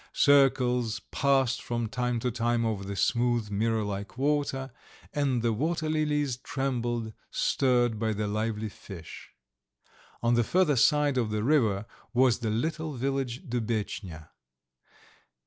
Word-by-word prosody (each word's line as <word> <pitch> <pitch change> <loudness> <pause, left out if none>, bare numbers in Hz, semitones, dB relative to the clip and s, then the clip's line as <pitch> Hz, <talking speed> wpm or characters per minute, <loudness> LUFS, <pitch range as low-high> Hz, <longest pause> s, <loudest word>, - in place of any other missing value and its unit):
Circles 125 -5 +3
passed 135 -2 +2
from 120 -1 -2
time 125 +1 -1
to 125 - 0
time 120 0 0
over 105 -3 -1
the 100 +1 -5
smooth, 120 0 +1
mirror 110 +2 +1
like 100 +2 -5
water, 135 -1 0 0.4
and 135 -5 0
the 115 -1 +2
water 155 +7 -1
lilies 150 -4 0
trembled, 120 -4 -2 0.2
stirred 120 -4 +1
by 110 0 0
the 105 0 -2
lively 110 +1 -2
fish. 90 -4 -11 0.9
On 120 +1 +3
the 120 0 +3
further 170 +2 +2
side 145 +1 +3
of 115 -3 0
the 105 0 -1
river 115 -8 +2 0.3
was 125 -1 +4
the 115 -3 -2
little 155 +7 -2
village 135 -1 -2
Dubetchnya. 105 -9 -3
120 Hz, 130 wpm, -28 LUFS, 110-135 Hz, 0.9 s, was